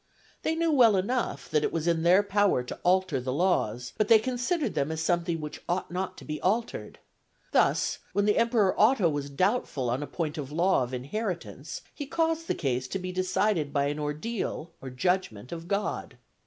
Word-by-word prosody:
They 320 Hz, -, 0 dB
knew 330 Hz, 0 st, +1 dB
well 240 Hz, -7 st, +6 dB
enough 235 Hz, +7 st, -1 dB
that 150 Hz, -1 st, +2 dB
it -, -, 0 dB
was 165 Hz, 0 st, -2 dB
in 165 Hz, -1 st, +2 dB
their 180 Hz, +4 st, +5 dB
power 205 Hz, -9 st, +2 dB
to 125 Hz, -, -7 dB
alter 180 Hz, -6 st, +2 dB
the 130 Hz, +1 st, -3 dB
laws, 130 Hz, -, 0 dB
but 215 Hz, -, +3 dB
they 225 Hz, -, +8 dB
considered 255 Hz, +7 st, -1 dB
them 140 Hz, +3 st, 0 dB
as 160 Hz, -, -3 dB
something 170 Hz, 0 st, 0 dB
which 150 Hz, -1 st, -7 dB
ought 175 Hz, 0 st, -1 dB
not 185 Hz, +1 st, -3 dB
to -, -, -11 dB
be 150 Hz, 0 st, -5 dB
altered. 225 Hz, +5 st, -1 dB, 0.5 s
Thus -, -, +2 dB
when 205 Hz, -, +1 dB
the 210 Hz, +1 st, +3 dB
emperor 230 Hz, -4 st, +3 dB
Otho 215 Hz, -4 st, +5 dB
was 145 Hz, -2 st, -3 dB
doubtful 150 Hz, -, 0 dB
on 125 Hz, +4 st, -1 dB
a 145 Hz, -, -4 dB
point 160 Hz, -2 st, -3 dB
of 135 Hz, -2 st, -5 dB
the 150 Hz, -, -8 dB
law 180 Hz, +1 st, +3 dB
of 125 Hz, -, -5 dB
inheritance, 180 Hz, -, -4 dB
he 290 Hz, -, -6 dB
caused 325 Hz, +2 st, 0 dB
the -, -, 0 dB
case 130 Hz, -2 st, -1 dB
to 195 Hz, -, -3 dB
be 185 Hz, -1 st, -5 dB
decided 185 Hz, -3 st, 0 dB
by 140 Hz, -1 st, +1 dB
an 145 Hz, +1 st, -3 dB
ordeal 155 Hz, +3 st, -3 dB
or 135 Hz, -, -6 dB
judgment 125 Hz, -, -1 dB
of 170 Hz, 0 st, -6 dB
God. 200 Hz, +2 st, -2 dB
180 Hz, 200 wpm, -28 LUFS, 150-210 Hz, 0.5 s, they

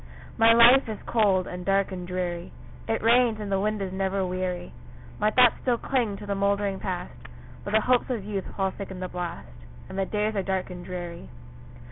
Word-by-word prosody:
My 225 Hz, 0 st, +6 dB
life 235 Hz, +2 st, +7 dB
is 215 Hz, -, -4 dB
cold, 200 Hz, -5 st, +2 dB
and 180 Hz, 0 st, -6 dB
dark, 195 Hz, +1 st, +1 dB
and 180 Hz, -1 st, -6 dB
dreary; 180 Hz, -1 st, -3 dB, 0.4 s
It 225 Hz, -, -1 dB
rains, 235 Hz, -1 st, +4 dB
and 205 Hz, -2 st, -5 dB
the 195 Hz, -, +2 dB
wind 210 Hz, 0 st, -1 dB
is 190 Hz, -1 st, -5 dB
never 190 Hz, 0 st, -1 dB
weary; 180 Hz, -1 st, -3 dB, 0.5 s
My 210 Hz, -, +3 dB
thoughts 245 Hz, +2 st, +5 dB
still 245 Hz, -2 st, +1 dB
cling 230 Hz, -6 st, -1 dB
to 205 Hz, -, -9 dB
the 200 Hz, -, -2 dB
mouldering 200 Hz, 0 st, 0 dB
Past, 180 Hz, -2 st, -4 dB, 0.5 s
But 205 Hz, -, -5 dB
the 220 Hz, -, +5 dB
hopes 250 Hz, +2 st, +2 dB
of 230 Hz, -6 st, -3 dB
youth 200 Hz, -2 st, -3 dB
fall 190 Hz, -1 st, +1 dB
thick 200 Hz, +1 st, -8 dB
in 190 Hz, -1 st, -7 dB
the 185 Hz, -, -3 dB
blast, 175 Hz, -, -5 dB, 0.4 s
And 190 Hz, -, -5 dB
the 195 Hz, -, +1 dB
days 215 Hz, +1 st, -1 dB
are 200 Hz, -, +1 dB
dark 190 Hz, -1 st, -2 dB
and 180 Hz, -1 st, -8 dB
dreary. 175 Hz, -, -7 dB
195 Hz, 205 wpm, -26 LUFS, 185-215 Hz, 0.5 s, life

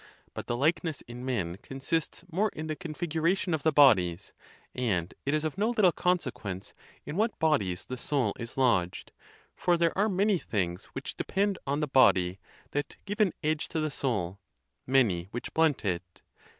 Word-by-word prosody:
But -, -, -6 dB
the 120 Hz, -, -1 dB
likeness 160 Hz, +2 st, +1 dB
in 120 Hz, +1 st, -9 dB
men 100 Hz, -10 st, -2 dB
consists 135 Hz, +8 st, -3 dB
more 205 Hz, +6 st, +2 dB
in 155 Hz, -, -4 dB
the 155 Hz, -1 st, -3 dB
configuration 170 Hz, +2 st, -1 dB
of 160 Hz, -, 0 dB
the 160 Hz, -, +3 dB
bodies: 100 Hz, -, +4 dB, 0.4 s
and 95 Hz, -9 st, -1 dB
it 145 Hz, -, +3 dB
is 155 Hz, -, 0 dB
of 155 Hz, +4 st, -3 dB
no 215 Hz, +3 st, +2 dB
little 215 Hz, -7 st, +4 dB
consequence 125 Hz, -, -2 dB, 0.3 s
in 150 Hz, +4 st, -5 dB
what 220 Hz, +3 st, +1 dB
bodies 105 Hz, -, +1 dB
the 130 Hz, -, -5 dB
soul 130 Hz, -5 st, 0 dB
is 115 Hz, +1 st, -6 dB
lodged; 95 Hz, -9 st, +1 dB, 0.4 s
for 175 Hz, -1 st, +2 dB
there 170 Hz, -1 st, +2 dB
are 205 Hz, +3 st, +2 dB
many 195 Hz, 0 st, +2 dB
things 90 Hz, -, -2 dB
which -, -, -6 dB
depend 200 Hz, 0 st, 0 dB
on 140 Hz, +2 st, 0 dB
the 150 Hz, -, 0 dB
body 95 Hz, -9 st, +4 dB, 0.3 s
that 145 Hz, 0 st, -3 dB
give 205 Hz, +2 st, -4 dB
an 195 Hz, -5 st, +3 dB
edge 155 Hz, 0 st, 0 dB
to 160 Hz, -, -2 dB
the 155 Hz, -1 st, -1 dB
soul, 100 Hz, -10 st, -1 dB, 0.5 s
many 115 Hz, -10 st, +3 dB
which 120 Hz, +4 st, -6 dB
blunt 160 Hz, -7 st, +2 dB
it. 90 Hz, -2 st, -3 dB
145 Hz, 175 wpm, -29 LUFS, 105-165 Hz, 0.5 s, bodies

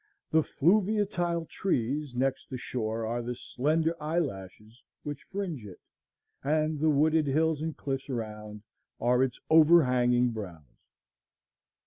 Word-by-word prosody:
The 160 Hz, -, +5 dB
fluviatile 175 Hz, -1 st, +1 dB
trees 140 Hz, -5 st, -2 dB
next 130 Hz, +1 st, -1 dB
the 130 Hz, -, -4 dB
shore 115 Hz, -2 st, -3 dB
are 120 Hz, +2 st, -2 dB
the 120 Hz, +1 st, -4 dB
slender 155 Hz, +7 st, 0 dB
eyelashes 120 Hz, -, -4 dB, 0.2 s
which 145 Hz, -1 st, -5 dB
fringe 185 Hz, -, -4 dB
it, 100 Hz, -4 st, -11 dB, 0.6 s
and 155 Hz, +1 st, 0 dB
the 155 Hz, +1 st, +3 dB
wooded 155 Hz, +1 st, +3 dB
hills 155 Hz, +2 st, +1 dB
and 160 Hz, -1 st, -4 dB
cliffs 135 Hz, 0 st, -4 dB
around 105 Hz, -3 st, -6 dB, 0.4 s
are 125 Hz, +1 st, +2 dB
its 130 Hz, -2 st, 0 dB
overhanging 125 Hz, -7 st, +5 dB
brows. 90 Hz, -, -9 dB
140 Hz, 120 wpm, -29 LUFS, 120-160 Hz, 0.6 s, The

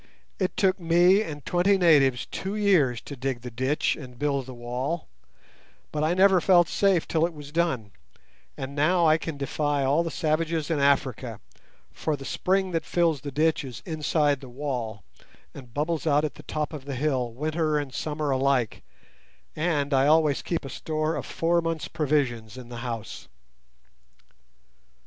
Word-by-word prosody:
It 185 Hz, -2 st, -1 dB
took 190 Hz, -2 st, +2 dB
me 175 Hz, +4 st, +4 dB
and 150 Hz, -8 st, -6 dB
twenty 180 Hz, +3 st, +3 dB
natives 145 Hz, -8 st, +4 dB
two 195 Hz, +2 st, -5 dB
years 165 Hz, -, +3 dB
to 140 Hz, -, -8 dB
dig 130 Hz, -1 st, -3 dB
the 125 Hz, 0 st, -7 dB
ditch 130 Hz, +5 st, 0 dB
and 125 Hz, -4 st, -11 dB
build 140 Hz, -2 st, -1 dB
the 130 Hz, -, -7 dB
wall, 125 Hz, +7 st, -3 dB, 0.8 s
but 150 Hz, 0 st, -1 dB
I 160 Hz, +3 st, +2 dB
never 190 Hz, -1 st, +5 dB
felt 175 Hz, -1 st, +5 dB
safe 195 Hz, -5 st, +2 dB
till 160 Hz, -1 st, +1 dB
it 170 Hz, -1 st, 0 dB
was 145 Hz, -1 st, -10 dB
done; 150 Hz, -11 st, 0 dB, 0.7 s
and 135 Hz, +1 st, -5 dB
now 165 Hz, +4 st, +3 dB
I 155 Hz, 0 st, +4 dB
can 160 Hz, -2 st, -5 dB
defy 145 Hz, 0 st, -1 dB
all 140 Hz, +5 st, +3 dB
the 170 Hz, -, -2 dB
savages 160 Hz, 0 st, -1 dB
in 155 Hz, -, +1 dB
Africa, 130 Hz, -5 st, +1 dB, 0.5 s
for 155 Hz, -, -2 dB
the 135 Hz, -1 st, -10 dB
spring 190 Hz, +6 st, 0 dB
that 165 Hz, -1 st, -1 dB
fills 165 Hz, -5 st, +1 dB
the 145 Hz, -, -5 dB
ditch 155 Hz, +2 st, +1 dB
is 125 Hz, -4 st, -8 dB
inside 150 Hz, -3 st, +1 dB
the 130 Hz, -, -10 dB
wall, 120 Hz, -6 st, -4 dB, 0.5 s
and 125 Hz, -4 st, -11 dB
bubbles 155 Hz, +4 st, -2 dB
out 150 Hz, 0 st, +3 dB
at 150 Hz, -, -4 dB
the -, -, -12 dB
top 155 Hz, +1 st, -2 dB
of 145 Hz, -3 st, -7 dB
the 140 Hz, -1 st, -4 dB
hill 130 Hz, -3 st, 0 dB
winter 155 Hz, +4 st, -1 dB
and 145 Hz, -3 st, -4 dB
summer 150 Hz, 0 st, -2 dB
alike, 130 Hz, -3 st, +1 dB, 0.7 s
and 150 Hz, -3 st, 0 dB
I 135 Hz, +1 st, +4 dB
always 155 Hz, -2 st, +3 dB
keep 170 Hz, -4 st, -3 dB
a -, -, -6 dB
store 155 Hz, +3 st, -2 dB
of -, -, -5 dB
four 170 Hz, +1 st, +1 dB
months' 165 Hz, -1 st, -3 dB
provision 135 Hz, -7 st, 0 dB
in 125 Hz, -2 st, -10 dB
the 120 Hz, -, -7 dB
house." 115 Hz, -3 st, -6 dB
150 Hz, 170 wpm, -26 LUFS, 135-165 Hz, 0.8 s, never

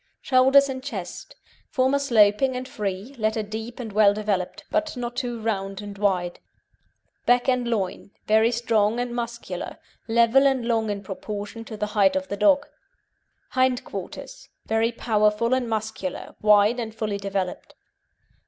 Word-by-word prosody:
SHOULDERS 265 Hz, +2 st, +5 dB
AND 260 Hz, -1 st, -5 dB
CHEST 280 Hz, -, -7 dB, 0.3 s
Former 265 Hz, +2 st, +2 dB
sloping 240 Hz, 0 st, +3 dB
and 255 Hz, 0 st, -4 dB
free, 205 Hz, 0 st, -4 dB
latter 220 Hz, 0 st, 0 dB
deep 220 Hz, +3 st, -7 dB
and 225 Hz, -4 st, -6 dB
well 205 Hz, -1 st, +5 dB
developed, 205 Hz, -4 st, -2 dB
but 315 Hz, -3 st, -1 dB
not 240 Hz, 0 st, -4 dB
too 240 Hz, -3 st, -3 dB
round 195 Hz, -3 st, -2 dB
and 205 Hz, -1 st, -7 dB
wide. 180 Hz, -4 st, 0 dB, 0.9 s
BACK 245 Hz, 0 st, +4 dB
AND 250 Hz, -2 st, +1 dB
LOIN 200 Hz, -5 st, -2 dB, 0.2 s
Very 220 Hz, +1 st, +4 dB
strong 230 Hz, -1 st, +1 dB
and 245 Hz, 0 st, -2 dB
muscular; 235 Hz, 0 st, -5 dB, 0.3 s
level 235 Hz, +4 st, +5 dB
and 265 Hz, -3 st, 0 dB
long 225 Hz, -2 st, +1 dB
in 200 Hz, -1 st, -3 dB
proportion 205 Hz, +3 st, -6 dB
to 220 Hz, -, -8 dB
the 210 Hz, -, -1 dB
height 200 Hz, +2 st, +4 dB
of 285 Hz, 0 st, -2 dB
the 200 Hz, -, -3 dB
dog. 285 Hz, +1 st, +4 dB, 0.8 s
HIND 255 Hz, -1 st, +1 dB
QUARTERS -, -, -8 dB, 0.2 s
Very 225 Hz, +1 st, +1 dB
powerful 215 Hz, 0 st, +1 dB
and 255 Hz, -2 st, 0 dB
muscular, 220 Hz, -4 st, -4 dB
wide, 210 Hz, +3 st, +5 dB
and 220 Hz, -2 st, -5 dB
fully 215 Hz, -2 st, -2 dB
developed. 195 Hz, -2 st, -4 dB
225 Hz, 150 wpm, -24 LUFS, 205-250 Hz, 0.9 s, SHOULDERS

